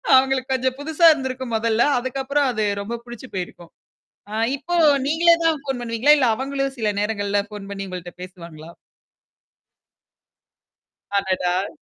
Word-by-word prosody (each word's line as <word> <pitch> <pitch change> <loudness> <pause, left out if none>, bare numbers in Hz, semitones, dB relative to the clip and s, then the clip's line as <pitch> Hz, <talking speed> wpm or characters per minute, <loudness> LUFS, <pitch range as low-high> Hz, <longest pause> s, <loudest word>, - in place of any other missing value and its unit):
அவுங்களுக்கு 265 0 +3
கொஞ்சம் 260 +1 -1
புதுசா 320 +3 +1
இருந்திருக்கும் 260 -4 -5
மொதல்ல. 225 +1 +1 0.2
அதுக்கப்புறம் 270 +2 -1
அது 215 -1 0 0.2
ரொம்ப 235 +3 -5
புடிச்சு 240 +2 -10
போயிருக்கும். 175 -2 -6 0.6
ஆ - - -6 0.2
இப்போ 350 +6 -6 0.3
நீங்களே 335 +2 +5
தான் 320 -3 +2
ஃபோன் 270 -3 -4
பண்ணுவீங்களா? 240 +6 +3
இல்ல 255 -3 +3
அவுங்களும் 275 +1 -3
சில 215 -1 +1
நேரங்கள்ல 205 -1 0
ஃபோன் 205 -2 -9
பண்ணி 195 0 -5
உங்கள்ட்ட 180 -1 -7
பேசுவாங்களா? 170 -3 -10 2.5
அடடா! 185 -1 0
240 Hz, 125 wpm, -22 LUFS, 200-270 Hz, 2.5 s, நீங்களே